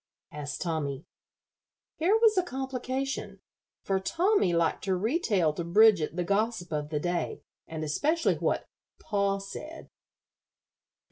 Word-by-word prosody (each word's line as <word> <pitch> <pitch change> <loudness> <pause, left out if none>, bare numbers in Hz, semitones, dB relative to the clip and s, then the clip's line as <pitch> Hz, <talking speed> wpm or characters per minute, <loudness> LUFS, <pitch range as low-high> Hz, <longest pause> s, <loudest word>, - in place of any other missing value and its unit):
asked 145 -2 -5
Tommy. 155 -5 -2 0.9
Here 375 +7 +3
was 450 -2 +5
a 370 - +4
complication, 265 - -4 0.4
for 195 -1 0
Tommy 350 - +2
liked 170 -1 +1
to 190 -1 +1
retail 205 - +1
to 170 - -4
Bridget 180 -2 +4
the 180 - 0
gossip 200 -1 0
of 150 -1 -2
the 150 -1 -1
day, 175 +2 -2 0.2
and 160 -1 -5
especially 305 - +1
what - - 0 0.3
"pa 200 -1 0
said." 305 +11 -9
195 Hz, 125 wpm, -28 LUFS, 165-265 Hz, 0.9 s, was